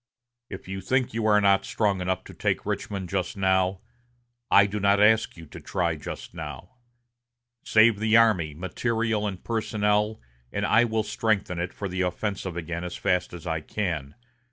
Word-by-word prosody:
If 95 -1 -8
you 95 0 -5
think 130 +5 0
you 110 -1 0
are 105 -1 +5
not 100 -1 +4
strong 100 -4 0
enough 95 0 -1
to - - -12
take - - -1
Richmond 95 -3 -3
just 95 +2 -2
now, 95 0 +1 0.7
I 100 - +7
do 105 +1 -3
not 100 0 +3
ask 110 -1 +4
you 80 - -10
to - - -11
try 85 -4 -1
just 75 - -8
now. 80 - -8 0.9
Save 110 -1 +4
the 110 +1 +4
army, 95 -10 +3
material 110 +5 -1
and 95 -3 -6
personnel, 105 -1 0 0.3
and - - -1
I 115 +2 +4
will 110 -1 0
strengthen 105 -4 -1
it 90 +1 -2
for 100 - -5
the 95 0 -3
offensive 95 0 -3
again 85 0 -4
as 90 0 -5
fast 90 -2 0
as 90 -1 -9
I 80 -2 -2
can. 80 -7 -3
100 Hz, 175 wpm, -26 LUFS, 90-110 Hz, 0.9 s, I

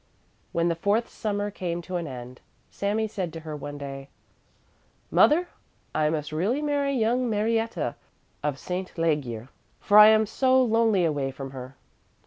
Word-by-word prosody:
When 170 0 +1
the 170 - +2
fourth 205 +7 +1
Summer 205 -1 -3
came 175 -3 -3
to 180 +1 -3
an 170 -2 -4
end, 125 -1 -9 0.3
Sami 210 +2 -1
said 190 -5 -4
to 165 - -7
her 155 -1 -6
one 145 0 -7
day: 135 -1 -7 1.0
"Mother, 350 +4 +4 0.4
I 150 0 +2
must 150 -1 -3
really 195 - 0
marry 290 -2 0
young 240 +1 +1
Marietta 220 - 0 0.5
of 145 -2 -1
St. 180 +5 -4
Legier, 135 -8 -1 0.3
for 205 +1 +5
I 210 - +11
am 220 0 +5
so 260 +4 +3
lonely 225 -6 +3
away 145 -4 0
from 135 0 -7
her." 130 0 -9
180 Hz, 155 wpm, -26 LUFS, 145-220 Hz, 1.0 s, I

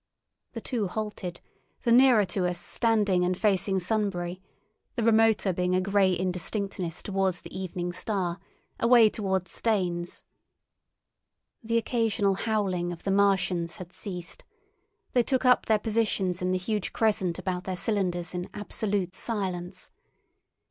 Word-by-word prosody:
The - - -5
two 230 -6 -1
halted, 205 -3 -5 0.4
the 235 - +2
nearer 245 -4 +6
to 180 0 -1
us 180 0 -2
standing 205 -3 +2
and 180 0 0
facing 195 -2 +2
Sunbury, 185 -2 -1 0.5
the 235 - -1
remoter 220 -3 +4
being 180 +1 0
a - - +3
grey 195 0 +3
indistinctness 185 -1 -3
towards 190 -3 -1
the - - -10
evening 180 -1 -4
star, 180 -2 -2 0.4
away 235 -2 +6
towards 190 -3 -2
Staines. 180 -6 -1 1.4
The 230 +1 +1
occasional 225 -4 +1
howling 190 -4 -1
of 170 - -8
the 195 - 0
Martians 190 -4 +2
had 185 -3 -10
ceased; 180 -4 -7 0.7
they 245 - +5
took 260 +2 0
up 250 0 +4
their 220 - +4
positions 210 -5 0
in 180 0 0
the 185 - +2
huge 205 +1 -2
crescent 205 -6 +1
about 185 0 -3
their 185 -1 -3
cylinders 180 -5 -1
in 180 0 -4
absolute 205 -2 -2
silence. 185 -4 -3
195 Hz, 135 wpm, -27 LUFS, 180-215 Hz, 1.4 s, nearer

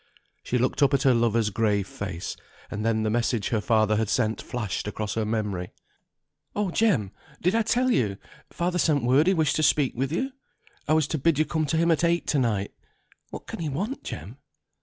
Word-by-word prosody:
She 125 - -1
looked 125 +4 0
up 140 0 +5
at 140 - 0
her 135 -3 +5
lover's 115 -2 +2
grave 105 -2 +1
face; 95 -4 -5 0.4
and 105 +1 -3
then 110 -1 +1
the 110 - 0
message 115 -2 0
her 110 -3 0
father 110 -1 +2
had 110 -1 0
sent 110 -2 0
flashed 110 -5 -4
across 105 0 -3
her 110 -1 -1
memory. 105 -5 -2 0.8
"Oh, 205 -3 0
Jem, 170 - +2 0.3
did 180 +3 +1
I 230 - +3
tell 250 +3 +2
you? 105 - +1 0.3
Father 180 +1 -1
sent 150 -5 +2
word 135 +7 +4
he 190 - +4
wished 155 -4 +2
to - - +1
speak 145 -3 +3
with 135 +3 -1
you. 265 - -1 0.6
I 155 - +3
was 155 -2 +3
to 160 - -1
bid 165 +1 +2
you 155 - +3
come 155 0 -1
to 160 - 0
him 170 +1 +3
at 160 0 +1
eight 170 0 +2
to 145 - +2
night. 105 -6 0 0.6
What - - -8
can - - -7
he 160 -3 -2
want, 200 - -3
Jem?" - - -7
130 Hz, 210 wpm, -26 LUFS, 110-160 Hz, 0.8 s, up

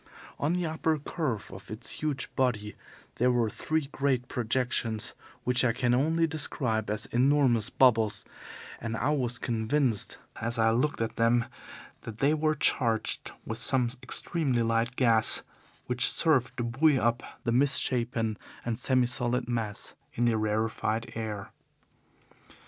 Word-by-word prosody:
On 150 +4 0
the 180 -1 -1
upper 160 0 -1
curve 140 - -4
of 95 - -12
its 110 +2 -2
huge 150 -3 -3
body 110 -6 -1 0.4
there 125 +2 +3
were 120 -3 +1
three 155 -2 -2
great 130 -3 -1
projections 120 -2 -1 0.3
which 125 0 +3
I 120 -2 +2
can 125 0 0
only 160 +6 +2
describe 125 -9 -1
as 105 0 -2
enormous 125 -3 +2
bubbles, 115 -5 +2 0.5
and 115 0 -4
I 130 +7 0
was 125 -5 -1
convinced 115 0 -1 0.2
as 115 +2 -3
I 110 0 +3
looked 125 +3 0
at 115 - -3
them 115 +1 +2 0.6
that 110 -2 -9
they 140 +5 +2
were 155 0 +1
charged 115 -6 0
with 110 +1 -5
some 125 -3 +4
extremely 135 -9 0
light 115 +2 0
gas 115 -4 +4 0.4
which 125 0 +5
served 135 -8 +3
to 120 - -2
buoy 135 +5 +2
up 120 +1 0 0.2
the 115 - -1
misshapen 120 -4 +3 0.3
and 115 -1 -2
semi 130 -1 +3
solid 120 0 -1
mass 115 -4 -3 0.2
in 120 - +1
the 120 -1 +2
rarefied 110 +1 -1
air. 110 -3 -5
120 Hz, 145 wpm, -28 LUFS, 115-135 Hz, 0.6 s, which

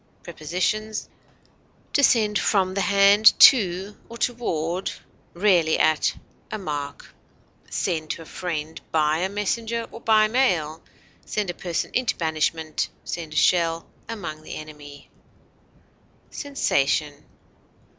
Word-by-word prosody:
Prepositions: 185 +7 -3 0.9
To 285 - +3
send 215 -5 +3
from 190 -3 +1
the 195 - -1
hand 200 +2 +5
to 195 -4 +6
or 235 - -9
toward 185 -8 -2 0.5
(rarely 175 -4 +3
at) 155 0 +2 0.3
a 215 - -4
mark; 145 -6 -6 0.6
send 160 -4 -2
to 165 - -4
a - - -16
friend 160 -2 -5
by 155 0 +2
a 185 +2 -1
messenger 225 +3 -2
or 230 - -10
by 215 -1 +4
mail; 180 - 0 0.4
send 205 -4 -2
a - - -10
person 175 -1 -3
into 250 -1 0
banishment; 160 -1 -1
send 160 -3 -6
a - - -4
shell 165 -2 +2 0.2
among 170 -9 -6
the - - -8
enemy. 145 -2 -11 1.2
SENSATION. 150 - -1
180 Hz, 115 wpm, -24 LUFS, 155-215 Hz, 1.2 s, to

